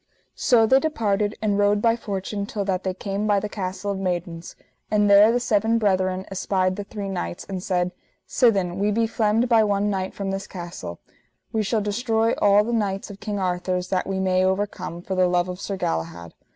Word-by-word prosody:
So 230 -3 +4
they 265 +4 +5
departed 210 -9 0
and 205 -1 +1
rode 205 0 +3
by 230 +2 +3
fortune 200 -2 -4
till 205 -2 -3
that 190 -1 -1
they 185 -1 -2
came 200 +2 -3
by 205 -1 +3
the 210 - -3
Castle 195 0 -4
of 195 - -3
Maidens; 175 -2 -4 0.3
and 210 -1 +3
there 205 +2 +7
the 245 - +1
seven 225 -1 +2
brethren 190 -3 +1
espied 185 -1 0
the 205 - -5
three 200 0 -6
knights, 85 - -4
and 190 -2 -4
said: 180 -1 0 0.4
Sithen, 195 -7 +2
we 205 +1 +2
be 225 +2 +2
flemed 225 +1 +1
by 230 -2 +5
one 205 0 +1
knight 190 -1 -3
from 195 -1 -3
this 195 0 -4
castle, 170 - -8 0.5
we 220 - +1
shall 215 +1 0
destroy 225 +2 0
all 205 0 +5
the 235 +2 -3
knights 200 -3 -1
of 200 - -11
King 205 0 -4
Arthur's 180 -1 -1
that 185 -1 0
we 195 -1 -2
may 185 -1 +2
overcome, 190 -2 -2
for 190 - -4
the 185 -1 +3
love 175 0 +1
of 180 +1 -6
Sir 195 - -4
Galahad. 85 - -3
200 Hz, 205 wpm, -23 LUFS, 185-210 Hz, 0.5 s, there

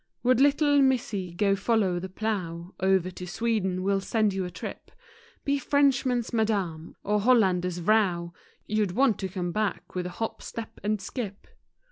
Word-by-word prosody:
Would 255 +1 +4
little 285 0 +4
Missey 215 -9 0
go 200 0 +3
follow 195 -3 +1
the 190 +2 -6
plough, 185 -4 -3
Over 190 -1 +2
to 180 0 -8
Sweden 190 -3 -1
we'll 195 0 +1
send 215 0 +1
you 190 -1 -2
a - - -4
trip; - - -8 0.6
Be 280 0 +1
Frenchman's 265 -4 +2
Madame, 195 -8 -1
or 210 0 +1
Hollander's 185 -7 +3
Vrow;— 175 -3 +2 0.3
You'd 210 -4 0
want 255 -2 +3
to 190 - -2
come 180 -2 -3
back, 215 +1 -2
with 180 -1 -2
a 180 - -10
hop, 225 - -3
step 230 -1 -7
and 210 +1 0
skip. 200 0 -6
205 Hz, 160 wpm, -27 LUFS, 180-230 Hz, 0.6 s, Would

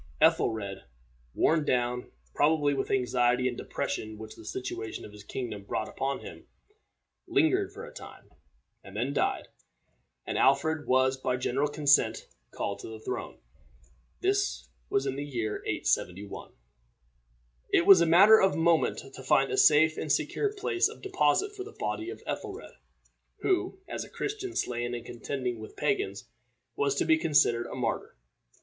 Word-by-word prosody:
Ethelred, 100 -4 +1 0.5
worn 160 -1 +3
down, 125 -2 0 0.2
probably, 145 -1 +3
with 135 - -2
the - - +2
anxiety 125 0 +2
and 125 - -2
depression 110 -2 -4
which 110 0 -9
the - - -13
situation 110 -1 -5
of - - -11
his 105 0 -12
kingdom 110 -2 -5
brought 110 +2 -3
upon 135 +1 -3
him, - - -11 0.8
lingered 380 +4 +2
for 445 +3 -9
a 485 - -12
time, - - -12 0.5
and 95 +1 -10
then 125 +5 -1
died, - - 0 0.8
and - - -2
Alfred 145 +3 +2
was 130 +1 +3
by 130 -1 -1
general 135 +3 0
consent 145 -1 +2 0.2
called 100 0 -4
to - - -8
the 110 -1 -8
throne. 110 - -5 0.8
This 400 +2 0 0.2
was 405 0 +1
in 135 - -2
the 145 - -3
year 120 -7 -3
871. 100 +3 -2 1.2
It 170 - +3
was 190 -3 +9
a 170 - +4
matter 200 +7 +8
of 195 - +3
moment 165 0 +2 0.2
to - - -9
find 135 +1 +3
a - - 0
safe 155 +1 +5
and 155 - -2
secure 400 - 0
place 395 -2 0
of 450 - -13
deposit 395 - +1
for 385 - -5
the 425 +3 -12
body 335 +1 -3
of 410 - -9
Ethelred, 420 0 -5 0.7
who, 375 0 0
as - - -4
a - - -12
Christian 395 -3 -4
slain 120 0 -2
in 120 - -6
contending 125 -1 -4
with 110 - -10
pagans, 410 0 -1 0.5
was 425 -1 +1
to - - 0
be 320 -1 +4
considered 130 - +3
a - - -7
martyr. 120 -3 -3
140 Hz, 160 wpm, -29 LUFS, -, 1.2 s, was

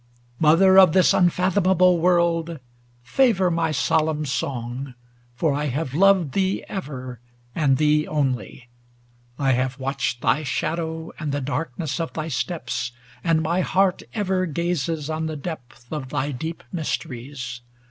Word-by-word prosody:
Mother 190 +5 +6
of 185 -5 +7
this 185 -1 +5
unfathomable 180 0 +3
world! 170 -1 +2 0.5
Favor 190 - +2
my 165 -1 +1
solemn 155 +1 +1
song, 130 -1 -4 0.4
for 150 +3 +1
I 145 +1 -1
have 140 0 -2
loved 190 -1 +4
ig - - -13
Thee 190 +4 0
ever, 130 - -6 0.3
and 140 -5 +2
thee 150 +1 +2
only; 130 -5 -2 0.7
I 135 -2 +2
have 130 +1 0
watched 130 -3 -2
Thy 150 - +2
shadow, 160 +3 -3
and 155 -3 -3
the 145 - -1
darkness 145 +2 -3
of 165 - -3
thy 155 0 -4
steps. 125 -4 -3 0.3
And 165 -2 +2
my 170 +3 +1
heart 185 0 +2
ever 190 -3 0
gazes 165 -2 -2
on 160 0 -2
the 155 -1 -4
depth 135 -6 -8
Of 140 -4 -4
thy 145 0 -1
deep 160 +6 -5
mysteries. 130 -6 -4
155 Hz, 140 wpm, -23 LUFS, 135-175 Hz, 0.7 s, of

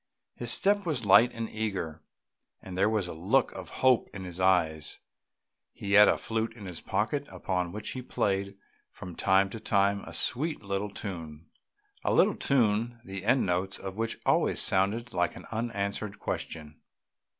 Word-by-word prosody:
His 120 -1 0
step 205 +6 +5
was 145 - -2
light 115 +5 +6
and 115 -1 -4
eager, 95 -9 -4 0.6
and 95 - -9
there 95 +3 +3
was 110 -4 0
a 90 - -6
look 95 +12 +1
of - - -8 0.2
hope 130 -3 +4
in 95 - -6
his 90 -1 -7
eyes; 85 -5 +1 0.7
he 100 - -6
had 105 0 +9
a - - +3
flute 115 0 -2
in 105 -4 -10
his 90 -3 -7
pocket 130 +9 -1
upon 90 -3 -2
which 105 +2 -6
he 130 - -4
played 100 -4 -1 0.3
from 90 -3 -10
time 95 +1 +3
to 115 - -6
time 100 -2 +1
a - - -10
sweet 150 0 -1
little 100 +1 -2
tune 85 -6 -8 0.5
a - - +1
little - - +5
tune 120 -2 +1
the 95 -2 -6
end 125 +4 +3
notes 95 +1 -1
of 95 -1 -7
which 115 +1 -2
always - - +2
sounded 110 +6 +1
like 90 -1 0
an - - -10
unanswered 105 -2 -3
question. 75 -2 -6
100 Hz, 170 wpm, -29 LUFS, 95-115 Hz, 0.7 s, had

